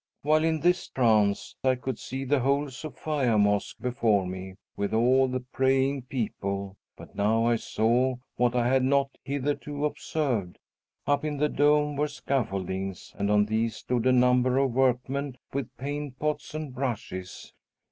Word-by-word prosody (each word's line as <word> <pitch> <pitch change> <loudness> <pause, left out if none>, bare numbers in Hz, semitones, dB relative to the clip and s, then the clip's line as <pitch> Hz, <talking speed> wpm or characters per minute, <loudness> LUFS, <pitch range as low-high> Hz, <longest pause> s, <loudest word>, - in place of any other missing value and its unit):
While 155 +2 +3
in 160 -1 +1
this 180 +1 +2
trance 110 -5 +2
I 130 -1 +3
could 130 +1 -5
see 135 +1 -5
the 140 +1 +2
whole 140 +2 +1
Sophia 140 -3 -1
Mosque 105 +4 +1
before 115 -6 +1
me, 95 +1 -6 0.2
with 100 +2 -1
all 130 +3 +4
the 130 0 -2
praying 135 +1 +1
people; 100 -5 -3 0.2
but - - -12
now 110 +3 +2
I 120 0 +3
saw 120 +4 +1 0.2
what 120 0 +1
I 120 -1 +2
had 130 +1 +3
not 135 +1 +2
hitherto 145 +1 -2
observed. 130 - -2 0.5
Up 145 0 +1
in 150 -1 -2
the 150 +1 +2
dome 150 0 +2
were 150 +1 +1
scaffoldings, 95 -10 -3
and 100 0 0
on 105 0 +4
these 110 +1 0
stood 125 +1 -1
a - - +5
number 125 0 +4
of 135 -1 +2
workmen 130 +1 0 0.2
with 135 -3 -2
paint 145 0 -4
pots 150 0 -3
and 155 -4 -5
brushes. 110 -8 -5
130 Hz, 155 wpm, -27 LUFS, 110-140 Hz, 0.5 s, a